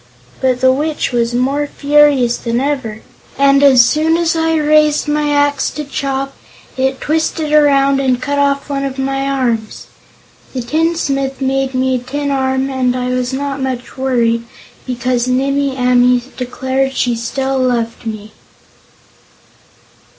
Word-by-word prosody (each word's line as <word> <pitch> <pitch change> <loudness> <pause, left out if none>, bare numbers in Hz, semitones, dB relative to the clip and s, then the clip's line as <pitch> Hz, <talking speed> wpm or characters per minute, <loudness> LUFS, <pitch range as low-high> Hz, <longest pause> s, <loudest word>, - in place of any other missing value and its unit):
But 255 -1 +1
the 260 0 +5
Witch 300 +2 -2
was 240 -1 0
more 275 +4 0
furious 285 -5 +3
than 235 0 -1
ever, 260 -6 -3 0.3
and 275 0 +4
as 260 -4 +6
soon 315 +4 +2
as 335 -1 0
I 325 0 +1
raised 305 -1 +3
my 295 0 0
axe 285 -1 +1
to 300 - -3
chop, 275 -1 -3 0.4
it 265 0 -1
twisted 315 0 -1
around 275 -2 +4
and 260 -2 +1
cut 285 +3 -2
off 280 0 +1
one 275 -1 -2
of 270 -1 -4
my 270 +1 -1
arms. 235 -5 -2 0.7
The 255 -2 -3
tinsmith 275 -2 -1
made 270 0 -1
me 260 0 +1
a - - -4
tin 285 +3 -4
arm 265 0 0
and 255 -1 0
I 250 0 -2
was 250 0 -1
not 275 +1 -3
much 255 -2 -4
worried, 235 -3 0 0.4
because 250 0 -1
Nimmie 275 +1 0
Amee 250 -1 +3
declared 260 +1 -2
she 245 -1 0
still 265 +3 -2
loved 235 -2 -1
me." 215 -1 -6
270 Hz, 145 wpm, -15 LUFS, 250-285 Hz, 0.7 s, as